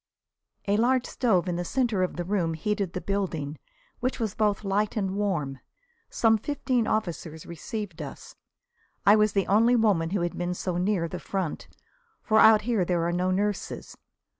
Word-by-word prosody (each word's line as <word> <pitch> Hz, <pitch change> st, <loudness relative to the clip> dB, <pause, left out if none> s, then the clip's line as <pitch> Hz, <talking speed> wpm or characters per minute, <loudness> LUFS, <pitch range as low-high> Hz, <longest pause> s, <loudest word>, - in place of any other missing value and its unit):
A 200 Hz, +1 st, +3 dB
large 250 Hz, +2 st, +2 dB
stove 195 Hz, -8 st, +1 dB
in 175 Hz, -1 st, -1 dB
the 175 Hz, -, -2 dB
centre 235 Hz, -1 st, 0 dB
of 185 Hz, -, -1 dB
the 175 Hz, -, -3 dB
room 175 Hz, -3 st, 0 dB
heated 200 Hz, +1 st, -2 dB
the 180 Hz, -, -3 dB
building, 165 Hz, -7 st, -3 dB, 0.4 s
which 255 Hz, +1 st, -2 dB
was 220 Hz, -4 st, -1 dB
both 210 Hz, -1 st, 0 dB
light 205 Hz, +3 st, 0 dB
and 195 Hz, -2 st, -1 dB
warm. 160 Hz, -10 st, -1 dB, 0.5 s
Some 225 Hz, -1 st, +3 dB
fifteen 255 Hz, -2 st, -1 dB
officers 170 Hz, -6 st, -3 dB
received 185 Hz, +2 st, -6 dB
us. -, -, -9 dB, 0.7 s
I 205 Hz, -, +8 dB
was 215 Hz, -1 st, +3 dB
the 195 Hz, -2 st, +1 dB
only 230 Hz, +5 st, +4 dB
woman 200 Hz, -8 st, +2 dB
who 195 Hz, 0 st, -1 dB
had 175 Hz, 0 st, -2 dB
been 175 Hz, 0 st, -2 dB
so 180 Hz, -1 st, -2 dB
near 180 Hz, -2 st, +1 dB
the 180 Hz, +2 st, -6 dB
front, 190 Hz, -5 st, -3 dB, 0.6 s
for 220 Hz, 0 st, +3 dB
out 215 Hz, -1 st, +7 dB
here 225 Hz, -4 st, +1 dB
there 175 Hz, -1 st, 0 dB
are 170 Hz, -, 0 dB
no 180 Hz, +1 st, 0 dB
nurses. 205 Hz, +2 st, -2 dB
195 Hz, 175 wpm, -27 LUFS, 175-215 Hz, 0.7 s, I